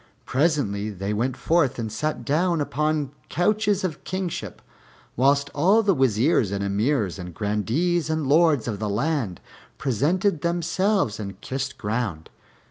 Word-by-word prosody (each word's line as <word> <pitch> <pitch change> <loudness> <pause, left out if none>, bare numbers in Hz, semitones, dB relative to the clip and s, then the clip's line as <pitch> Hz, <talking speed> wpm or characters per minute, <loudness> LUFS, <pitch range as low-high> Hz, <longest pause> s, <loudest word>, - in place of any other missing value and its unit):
Presently 125 -9 0
they 100 0 -3
went 120 +5 -1
forth 160 -6 +2
and 110 -2 -3
sat 150 +8 -3
down 170 +3 +1
upon 150 -1 -1 0.2
couches 205 +3 +1
of 165 -5 -3
kingship, 185 -2 -4 0.6
whilst 140 +3 +2
all 195 +10 +4
the 200 -2 +3
Wazirs 125 - +2
and 100 0 -2
Emirs 100 - 0
and 90 -2 -8
Grandees 130 - 0
and 155 -2 0
Lords 150 -3 +3
of 105 -4 -3
the 105 -1 -2
land 115 - -1 0.4
presented 155 - +1
themselves 170 - 0
and 100 -2 -6
kissed 135 +2 -4
ground. 105 -7 -3
140 Hz, 135 wpm, -24 LUFS, 105-170 Hz, 0.6 s, all